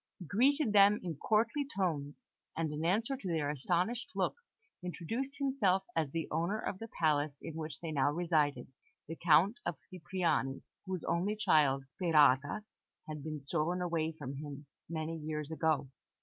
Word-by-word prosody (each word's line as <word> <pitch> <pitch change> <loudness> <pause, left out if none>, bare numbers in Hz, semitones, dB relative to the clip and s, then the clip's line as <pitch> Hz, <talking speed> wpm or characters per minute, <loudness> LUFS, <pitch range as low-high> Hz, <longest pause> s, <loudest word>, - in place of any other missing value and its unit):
He 180 - -9
greeted 255 - +3
them 205 +1 +7
in 170 -5 -4
courtly 230 - +2
tones, 150 -7 -2 0.3
and 160 -2 0
in 150 +1 -3
answer 220 +10 +1
to 260 - -7
their 155 -4 0
astonished 180 - 0
looks, 475 0 -3 0.3
introduced 225 - -4
himself 235 -10 +2
as 160 -3 +1
the 165 +2 -3
owner 170 +7 0
of 195 -3 -4
the 225 - -6
palace 150 -3 +2
in 165 - -7
which 155 -1 -6
they 165 -2 -5
now 145 -2 +2
resided, 150 -6 0 0.3
the 165 - -5
Count 175 +8 +4
of - - -2
Cipriani, 170 -6 -1 0.2
whose 185 -2 -3
only 190 +5 0
child, 145 -9 +3
Sperata, 145 +2 +3 0.4
had 150 -2 -6
been 155 -2 -5
stolen 175 +4 0 0.3
from 140 -3 -6
him 145 0 -7 0.2
many 160 0 -3
years 150 -1 -4
ago. 155 -3 +1
165 Hz, 155 wpm, -33 LUFS, 150-195 Hz, 0.4 s, them